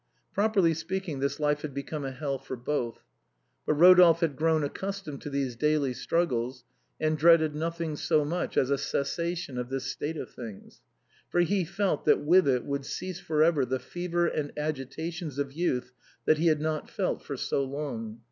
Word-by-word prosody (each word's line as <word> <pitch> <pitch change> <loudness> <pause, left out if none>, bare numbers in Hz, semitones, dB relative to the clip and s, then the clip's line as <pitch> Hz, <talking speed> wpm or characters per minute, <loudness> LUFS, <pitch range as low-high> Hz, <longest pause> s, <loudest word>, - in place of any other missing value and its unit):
Properly 200 -5 +3
speaking, 165 -1 -4
this 140 +2 -1
life 150 -1 +1
had 145 -3 -6
become 145 +1 -4
a - - -2
hell 135 +1 -3
for 135 0 -6
both. 120 -1 -3 0.6
But 150 - +3
Rodolphe 175 0 +7
had 160 -4 +1
grown 160 +1 +2
ac 145 - -2
customed 195 -8 -5
to - - -5
these 140 -3 -2
daily 150 0 +1
struggles, 125 -5 -1 0.4
and 155 0 +1
dreaded 160 -2 +5
nothing 165 0 -3
so 150 0 +2
much 175 +4 -2
as 130 - +3
a 140 - +2
cessation 165 0 -2
of 125 0 -4
this 135 -1 -3
state 145 +4 -3
of - - -6
things! 110 -5 -10 0.5
for 175 - +2
he 185 +2 +2
felt 190 -1 -1
that - - +4
with 175 +3 +5
it 125 -3 +2
would 140 0 -2
cease 180 +5 -5
for 155 -4 +2
ever 160 -4 +3
the 130 +1 -1
fevers 175 +3 -1
and 145 -1 -2
agitations 155 +2 -4
of 140 -1 -2
youth 155 -6 -1 0.3
that 155 - +4
he 170 - +3
had 155 -2 +3
not 155 -1 -2
felt - - -1
for - - -6
so 140 - 0
long. 130 -6 -5
150 Hz, 185 wpm, -28 LUFS, 135-170 Hz, 0.6 s, Rodolphe